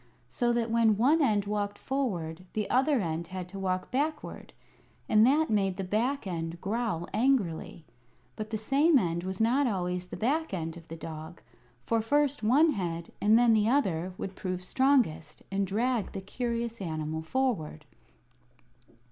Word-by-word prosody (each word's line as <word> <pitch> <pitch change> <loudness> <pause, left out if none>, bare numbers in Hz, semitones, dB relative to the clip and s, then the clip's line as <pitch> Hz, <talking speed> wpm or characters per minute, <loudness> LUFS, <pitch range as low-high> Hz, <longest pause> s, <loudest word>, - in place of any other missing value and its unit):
So 240 -3 0
that 235 -1 0
when 225 -3 +4
one 285 +9 +4
end 210 -7 +2
walked 205 0 -2
forward 185 -11 -3
the 210 -1 -1
other 265 +2 +3
end 165 -1 -3
had 185 0 -6
to 195 - -7
walk 185 -1 -2
backward, 300 +4 -3 0.6
and 215 0 +5
that 300 +2 +3
made 195 -3 +1
the 195 - -2
back 230 +8 -1
end 165 -2 -4
growl 205 -4 -2
angrily. 215 -10 0 0.5
But 215 0 -5
the 220 - -2
same 280 +8 +3
end 170 -6 0
was 190 0 -4
not 250 +5 +3
always 180 -4 -2
the - - -7
back 285 +1 0
end 165 -2 -4
of 165 -1 -12
the 165 - -7
dog; 160 +1 -8 0.4
for 230 -1 +1
first 290 +4 +1
one 280 +9 +4
head, 170 - -4
and 215 +2 +5
then 240 -1 +5
the 215 0 +3
other, 185 - +1
would 190 -1 -5
prove 185 -1 -4
strongest, 180 - +1
and 195 0 0
drag 230 +3 0
the 195 - -4
curious 235 +2 -3
animal 160 -2 -3
forward. 160 -7 -2
210 Hz, 165 wpm, -29 LUFS, 180-250 Hz, 0.6 s, and